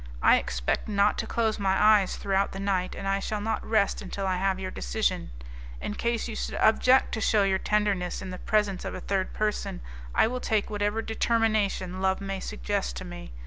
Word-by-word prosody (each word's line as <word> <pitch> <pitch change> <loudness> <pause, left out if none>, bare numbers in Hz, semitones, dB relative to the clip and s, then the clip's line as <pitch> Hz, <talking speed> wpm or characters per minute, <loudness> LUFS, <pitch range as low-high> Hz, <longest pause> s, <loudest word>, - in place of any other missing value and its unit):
I - - +7
expect - - -2
not 205 -1 +2
to - - -2
close 225 -2 0
my 195 -1 +1
eyes 210 -3 +4
throughout 195 0 0
the 195 - -6
night, 190 -2 -1
and 195 - -5
I 195 0 +1
shall 210 +1 -3
not 220 +1 -2
rest 215 -3 +1
until 195 0 -4
I 185 -1 0
have 190 0 0
your 185 -1 -4
decision. - - -1 0.5
In - - -4
case 235 +2 -1
you 225 - -5
should - - -3
object 255 +4 +4
to 220 - -2
shew 215 -2 +3
your 190 -1 +2
tenderness 205 -4 0
in 190 - -6
the 185 - -7
presence 210 -3 0
of - - -5
a - - -5
third 195 -1 -1
person, 210 - -2 0.4
I - - +5
will 250 +3 -2
take 215 -3 0
whatever 210 +2 -1
determination 215 -5 0
love 190 0 +1
may 195 -1 -4
suggest 60 - -3
to - - -6
me. - - -9
200 Hz, 205 wpm, -27 LUFS, 190-215 Hz, 0.5 s, I